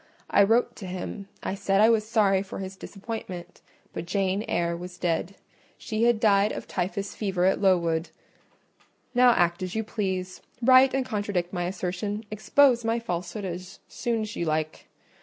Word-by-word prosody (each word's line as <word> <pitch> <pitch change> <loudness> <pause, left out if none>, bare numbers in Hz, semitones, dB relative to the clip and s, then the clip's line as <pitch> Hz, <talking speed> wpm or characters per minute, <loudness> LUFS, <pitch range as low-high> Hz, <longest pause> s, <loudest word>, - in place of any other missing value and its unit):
I - - +5
wrote 225 +4 +3
to 195 - -7
him; 185 +2 -6 0.2
I - - -2
said 195 0 +1
I 220 +2 +6
was 215 -1 +1
sorry 200 -4 +3
for 195 - -7
his 190 0 -6
disappointment, 190 -4 -7 0.3
but 170 - -5
Jane 195 +1 0
Eyre 170 0 0
was 180 +1 -8
dead: 175 +2 -1 0.4
she 220 0 -1
had 240 -2 +3
died 205 -1 +4
of - - -6
typhus 195 +2 -3
fever 190 -4 -1
at 190 - +2
Lowood. 170 -4 +2 1.0
Now 250 0 +6
act 175 -5 +2
as 185 +1 -4
you 220 - 0
please: 190 -4 -3 0.2
write 260 +2 +6
and 265 -1 0
contradict 205 -6 -2
my 175 -2 -1
assertion—expose 210 +7 +1
my 225 +1 +1
falsehood 180 -2 -4
as 180 0 -6
soon 235 -2 -2
as 215 0 -5
you - - -2
like. 155 0 -2
195 Hz, 165 wpm, -26 LUFS, 180-220 Hz, 1.0 s, I